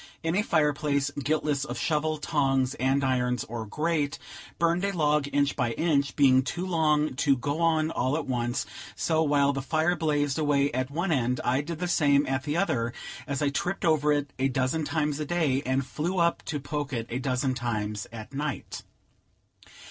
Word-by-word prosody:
In 165 +1 0
a 205 - +3
fire 155 -7 +2
place, 140 -1 0
guiltless 145 0 -1
of 150 - -5
shovel, 155 0 0
tongs, 135 -4 +1
andirons, 130 -2 +1
or 115 -1 -6
grate, 150 +3 -1 0.4
burned 170 +2 +1
a 200 - +1
log, 150 -2 +2
inch 145 0 +1
by 115 - 0
inch, 140 -4 +1
being 130 -3 +5
too 175 +7 -4
long 155 -4 +2
to - - -10
to 140 -1 +3
go 145 +5 -2
on 160 -1 +2
all 130 +2 0
at 160 - -3
once; 120 -1 -1 0.3
so, 160 -1 +1
while 145 -2 +3
the 135 - -2
fire 160 +5 +1
blazed 145 -3 0
away 145 -2 +2
at 130 +1 -2
one 170 +5 -1
end, 125 -3 +1
I 130 +3 +2
did 165 +2 -5
the 180 +2 -2
same 145 -4 +3
at 130 0 -2
the 150 +2 -1
other, 130 -11 0 0.3
as 140 +1 -2
I 145 - +3
tripped 175 +7 -2
over 150 -2 +3
it 145 -1 -1
a 135 - +3
dozen 130 +4 0
times 150 -1 -1
a 150 - -2
day, 150 -6 +1
and 130 +1 +1
flew 170 +7 -3
up 170 -1 +2
to 150 -2 -3
poke 145 0 -4
it 115 -2 -2
a 125 - -1
dozen 130 0 0
times 105 -4 -3
at 115 +3 -9
night. 145 0 -4
145 Hz, 195 wpm, -27 LUFS, 130-155 Hz, 0.4 s, being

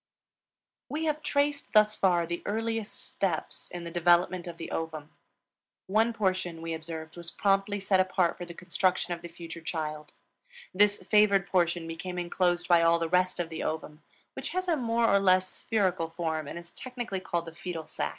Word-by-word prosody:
We 315 +2 -2
have 305 -1 0
traced 285 0 0
thus 215 0 +5
far 175 -3 +3
the 170 +1 -4
earliest 225 0 -3
steps 180 -5 -2
in 175 -1 -6
the 170 - -6
development 175 +1 +3
of 170 -1 -7
the 165 - -7
ovum. 155 -2 -4 0.7
One 220 +4 +3
portion, 185 -6 -1
we 165 0 -3
observed, 160 -1 -6
was 170 -1 -7
promptly 195 +2 +1
set 195 -1 +2
apart 185 -2 +2
for 175 - -7
the 170 -1 -10
construction 180 0 0
of 170 - -7
the 175 - -7
future 170 0 -9
child; 155 -2 -4 0.6
this 205 +2 +3
favored 205 -3 +4
portion 175 -3 +1
became 180 +2 -5
inclosed 175 0 0
by 175 -1 +6
all 165 0 +5
the 165 -1 -2
rest 180 +1 +2
of 170 -2 -2
the 160 -1 -5
ovum, 155 0 -4 0.3
which - - -5
has 370 0 -2
a 340 - +3
more 235 -3 +1
or 200 -2 +5
less 185 -1 +3
spherical 185 -6 0
form 160 -2 -3
and - - -6
is 170 0 -10
technically 245 -6 -5
called 175 -2 -2
the 165 - -9
fetal 165 -2 -5
sac. 155 - -2
180 Hz, 185 wpm, -29 LUFS, 165-200 Hz, 0.7 s, by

